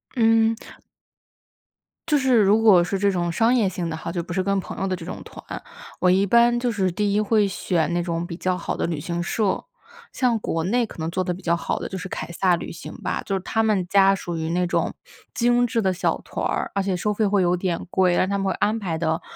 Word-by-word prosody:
嗯。 225 -1 +4 1.5
就 300 -2 +4
是 260 -2 +2
如 210 +3 +4
果 195 -6 +6
是 190 +2 -2
这 200 0 +3
种 175 -2 -1
商 230 +6 +3
业 215 -6 +2
性 175 -2 -4
的 160 - -3
哈， 165 +1 -5
就 175 - -2
不 175 +1 -7
是 185 +1 0
跟 200 0 +1
朋 - - -7
友 195 - 0
的 185 - -1
这 170 -2 -9
种 - - -7
团， - - -9 0.4
我 180 0 +5
一 195 +2 +3
般 235 +3 +4
就 245 - 0
是 190 -4 0
第 205 +2 0
1 210 - +3
会 210 -1 +2
选 175 -3 -1
那 175 0 0
种 170 0 -3
比 170 - -6
较 185 0 -1
好 175 - -3
的 - - -1
旅 165 -3 -2
行 170 +2 -3
社。 205 +2 -1 0.5
像 245 -3 +1
国 165 -5 -2
内 235 +5 +1
可 - - -13
能 160 0 -3
做 185 +1 -1
得 180 - -2
比 190 - -12
较 170 0 +2
好 - - -2
的 - - -4
就 190 - -6
是 185 - -7
凯 - - -5
撒 180 0 +2
旅 - - -6
行 165 - -9
吧， - - -2
就 195 - -1
是 - - 0
他 225 +3 0
们 205 -5 +1
家 195 0 +5
属 175 -3 -5
于 160 0 -3
那 180 +1 +1
种 175 - -1 0.4
精 245 0 +3
致 230 -1 0
的 190 -1 +2
小 180 - 0
团 - - -5
儿， - - -1
而 200 - 0
且 190 -1 -1
收 210 +4 -1
费 215 +1 +1
会 200 -1 +2
有 175 +1 +2
点 175 -2 -2
贵， 180 -2 +3
但 185 - +2
他 200 +1 -1
们 195 - -2
会 - - +1
安 215 +2 0
排 170 -5 -3
得 160 +1 -1
190 Hz, 275 characters per minute, -23 LUFS, 175-215 Hz, 1.5 s, 果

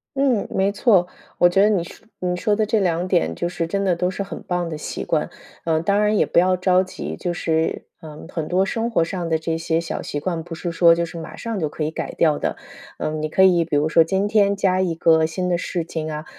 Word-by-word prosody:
嗯， 270 -6 +1
没 195 +1 +1
错， 200 -4 +3 0.3
我 175 - +6
觉 175 - +1
得 210 - +5
你 195 -5 +1
说 170 - -13
你 180 -1 -1
说 205 +4 +1
的 215 0 0
这 220 +1 +2
2 175 -2 0
点 80 - +1
就 175 - -3
是 170 -1 -2
真 195 +4 -2
的 185 -3 +2
都 180 +2 -1
是 190 - -5
很 195 - -7
棒 180 -1 -2
的 155 - -5
习 150 - -5
惯， - - -1 0.3
啊， 160 -1 +1
当 200 +5 +1
然 210 +1 +2
也 - - +4
不 - - -2
要 185 +2 +5
着 185 0 +3
急， 185 - -6
就 175 - -3
是 160 -2 -1 0.2
嗯， 155 0 -10
很 160 -3 -3
多 185 +2 +2
生 230 +4 -2
活 170 - +2
上 175 0 -4
的 160 -1 0
这 160 0 -2
些 165 0 0
小 165 - -5
习 145 - -4
惯， 165 +1 -3
不 170 0 -9
是 170 +1 -4
说 170 0 +5
就 170 +1 0
是 170 0 -6
马 160 - -8
上 230 -3 -4
就 155 - 0
可 150 +1 -5
以 150 - 0
改 160 - -5
掉 155 -3 +3
的。 - - -2 0.4
嗯， 155 0 -3
你 - - 0
可 190 - +1
以 180 -3 +5
比 155 - -2
如 150 +2 +2
说 165 0 +5
今 190 +5 0
天 205 -1 +3
加 185 -1 +1
一 180 -3 0
个 160 -1 +3
新 180 +3 -2
的 175 - +1
事 175 0 -3
情 160 -1 -5
啊， 150 +1 -5
175 Hz, 280 characters per minute, -21 LUFS, 160-190 Hz, 0.4 s, 我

